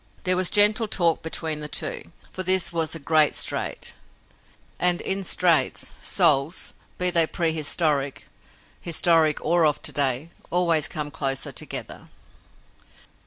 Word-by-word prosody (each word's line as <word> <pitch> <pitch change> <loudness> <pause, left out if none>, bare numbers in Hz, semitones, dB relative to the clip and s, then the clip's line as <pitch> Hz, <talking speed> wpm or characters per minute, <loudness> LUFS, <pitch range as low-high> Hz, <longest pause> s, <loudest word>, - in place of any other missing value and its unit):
There 185 -1 +3
was 185 -1 +2
gentle 215 +2 +6
talk 170 -5 0
between 160 -1 -3
the 150 - -6
two, - - -4 0.2
for 185 - -5
this 185 -1 +1
was 160 -1 -1
a - - -7
great 155 0 +2
strait - - -3 0.9
and, 180 -1 +3
in 195 0 -2
straits, 175 -3 +1
souls, 140 +6 +2 0.2
be 180 0 +4
they 165 -2 +4
prehistoric, 155 -4 -2 0.6
historic 165 -2 +1
or 170 +1 +1
of 150 -2 +1
to - - 0
day, 140 +3 0 0.2
always 170 -4 +2
come 150 -1 -6
closer 135 -1 -2
together. - - -6
165 Hz, 130 wpm, -23 LUFS, 150-180 Hz, 0.9 s, gentle